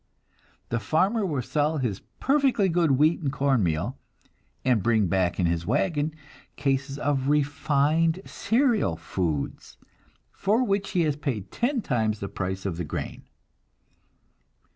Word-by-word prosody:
The 115 Hz, -, 0 dB
farmer 190 Hz, -, +1 dB
will 145 Hz, -7 st, -1 dB
sell 150 Hz, +5 st, 0 dB
his 120 Hz, -8 st, -2 dB, 0.2 s
perfectly 270 Hz, -8 st, +3 dB
good 170 Hz, -1 st, +2 dB
wheat 155 Hz, +5 st, +3 dB
and 140 Hz, -4 st, -1 dB
corn 135 Hz, -3 st, +2 dB
meal, 80 Hz, -4 st, -1 dB, 0.7 s
and 125 Hz, -5 st, +3 dB
bring 110 Hz, -1 st, +3 dB
back 90 Hz, 0 st, 0 dB
in 90 Hz, -, +2 dB
his 85 Hz, 0 st, -1 dB
wagon 150 Hz, -, 0 dB, 0.4 s
cases 135 Hz, -1 st, -1 dB
of 140 Hz, -2 st, 0 dB
"refined" 150 Hz, +3 st, +2 dB
cereal 225 Hz, -, +1 dB
foods, 85 Hz, -3 st, -3 dB, 0.5 s
for 215 Hz, +6 st, +1 dB
which 200 Hz, -4 st, 0 dB
he 180 Hz, -, +3 dB
has 150 Hz, -3 st, +1 dB
paid 135 Hz, -10 st, -4 dB
ten 245 Hz, -1 st, 0 dB
times 110 Hz, -5 st, 0 dB
the 100 Hz, -, -4 dB
price 95 Hz, 0 st, -4 dB
of 90 Hz, -4 st, -2 dB
the 90 Hz, -, -2 dB
grain! 75 Hz, -, -5 dB
140 Hz, 140 wpm, -26 LUFS, 105-165 Hz, 0.7 s, perfectly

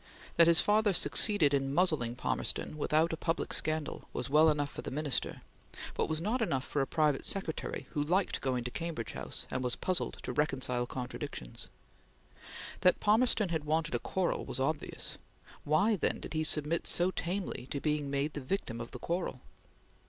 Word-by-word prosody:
That 170 Hz, -, +8 dB
his 170 Hz, 0 st, +8 dB
father 210 Hz, -1 st, +3 dB
succeeded 175 Hz, -, +4 dB
in 135 Hz, 0 st, 0 dB
muzzling 155 Hz, -10 st, +2 dB
Palmerston 130 Hz, -, -2 dB
without 155 Hz, +2 st, +1 dB
a -, -, -2 dB
public 165 Hz, 0 st, -1 dB
scandal, 155 Hz, -1 st, -2 dB
was -, -, -3 dB
well 155 Hz, +2 st, +6 dB
enough 145 Hz, -2 st, 0 dB
for -, -, -6 dB
the -, -, -5 dB
Minister, 145 Hz, -1 st, -2 dB, 0.5 s
but -, -, -1 dB
was 155 Hz, 0 st, +1 dB
not 220 Hz, +9 st, -1 dB
enough 135 Hz, -11 st, 0 dB
for 145 Hz, -, -1 dB
a 135 Hz, -, 0 dB
private 150 Hz, -4 st, +1 dB
secretary 190 Hz, -5 st, -3 dB
who 145 Hz, -3 st, 0 dB
liked 180 Hz, +5 st, +1 dB
going 125 Hz, -2 st, -1 dB
to 125 Hz, -, -3 dB
Cambridge 165 Hz, -9 st, -4 dB
House, -, -, -3 dB
and 130 Hz, -, -2 dB
was 125 Hz, -1 st, 0 dB
puzzled 185 Hz, -1 st, -1 dB
to -, -, -4 dB
reconcile 130 Hz, -4 st, 0 dB
contradictions. 125 Hz, -, -5 dB, 1.1 s
That 180 Hz, -, +4 dB
Palmerston 215 Hz, -1 st, +3 dB
had 160 Hz, -3 st, -1 dB
wanted 155 Hz, +2 st, 0 dB
a -, -, +1 dB
quarrel 190 Hz, -2 st, -1 dB
was -, -, -3 dB
obvious; 150 Hz, +3 st, -2 dB, 0.5 s
why, 200 Hz, +9 st, +3 dB
then, -, -, 0 dB
did -, -, -7 dB
he 155 Hz, 0 st, 0 dB
submit 155 Hz, +1 st, +1 dB
so 175 Hz, +2 st, +2 dB
tamely 180 Hz, -8 st, -3 dB
to 140 Hz, -, -2 dB
being 150 Hz, -1 st, -1 dB
made 140 Hz, +2 st, -1 dB
the 145 Hz, -, -5 dB
victim 130 Hz, -5 st, -3 dB
of 115 Hz, -, -6 dB
the -, -, -8 dB
quarrel? 170 Hz, -7 st, -3 dB
155 Hz, 180 wpm, -32 LUFS, 140-175 Hz, 1.1 s, That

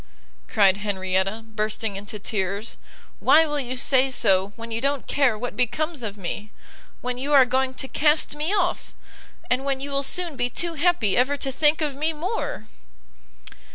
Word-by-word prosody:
cried 195 Hz, -3 st, +4 dB
Henrietta, 195 Hz, +1 st, -1 dB
bursting 215 Hz, -1 st, -2 dB
into 205 Hz, +2 st, -6 dB
tears, 200 Hz, +1 st, -3 dB, 0.4 s
"why 320 Hz, +1 st, +6 dB
will 295 Hz, -1 st, -1 dB
you 255 Hz, -1 st, -4 dB
say 265 Hz, +1 st, +3 dB
so 195 Hz, -6 st, +2 dB
when 230 Hz, 0 st, -9 dB
you 225 Hz, 0 st, -2 dB
don't 280 Hz, 0 st, -1 dB
care 270 Hz, -6 st, +2 dB
what 245 Hz, +3 st, -5 dB
becomes 275 Hz, +5 st, -1 dB
of 210 Hz, -3 st, -5 dB
me! 205 Hz, +3 st, -5 dB, 0.5 s
when 250 Hz, 0 st, -3 dB
you 285 Hz, +3 st, -2 dB
are 270 Hz, -2 st, +8 dB
going 260 Hz, +1 st, 0 dB
to 265 Hz, -, -3 dB
cast 300 Hz, +1 st, +2 dB
me 305 Hz, +4 st, -2 dB
off! 390 Hz, -4 st, -1 dB, 0.5 s
and 255 Hz, +1 st, 0 dB
when 275 Hz, -1 st, -1 dB
you 280 Hz, +1 st, -6 dB
will 275 Hz, 0 st, 0 dB
soon 335 Hz, +3 st, +1 dB
be 245 Hz, -1 st, -1 dB
too 335 Hz, +7 st, -1 dB
happy 325 Hz, -, +2 dB
ever 270 Hz, +4 st, +2 dB
to 270 Hz, -1 st, -2 dB
think 300 Hz, +4 st, +3 dB
of 295 Hz, -3 st, -1 dB
me 310 Hz, +3 st, -1 dB
more!" 310 Hz, -, -3 dB
255 Hz, 175 wpm, -24 LUFS, 215-295 Hz, 0.5 s, are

